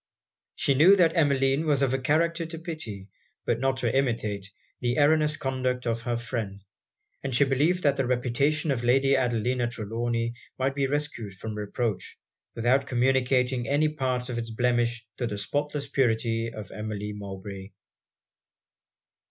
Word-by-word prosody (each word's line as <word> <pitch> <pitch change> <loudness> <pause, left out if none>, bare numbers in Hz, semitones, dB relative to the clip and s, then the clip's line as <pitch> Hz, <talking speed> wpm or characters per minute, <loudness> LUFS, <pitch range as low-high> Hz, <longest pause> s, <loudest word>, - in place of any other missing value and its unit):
She 140 - +2
knew 165 +9 +7
that 170 -3 +3
Emmeline 140 -1 +2
was 140 -2 +3
of 130 -1 +1
a 135 - +1
character 165 +5 +1
to 165 0 -7
pity, 155 - -6 0.4
but 115 - +1
not 135 0 +1
to 125 -1 0
imitate, 110 -7 0 0.3
the 120 0 0
erroneous 150 +1 +3
conduct 130 -2 -1
of 115 -1 -1
her 120 0 -1
friend; 110 -5 -4 0.6
and 135 -3 -2
she 140 - +5
believed 150 +7 +2
that 140 -1 +3
the 135 -2 0
reputation 135 +5 +1
of 120 -3 -1
Lady 135 +3 +4
Adelina 125 -1 +1
Trelawny 115 +1 -2 0.2
might 130 +1 0
be 135 -1 0
rescued 135 -8 -3
from 110 +3 -6
reproach, 105 +1 -3 0.4
without 125 +4 +2
communicating 125 -1 +2
any 150 +2 +3
part 130 -4 -2
of 120 -1 -2
it's 115 -1 -4
blemish 120 0 0
to 120 - -1
the 105 -2 -4
spotless 145 +7 -2
purity 115 -2 +1
of 110 -3 -8
Emmeline 105 0 -5
Mowbray. 95 -1 -7
125 Hz, 150 wpm, -27 LUFS, 115-140 Hz, 0.6 s, knew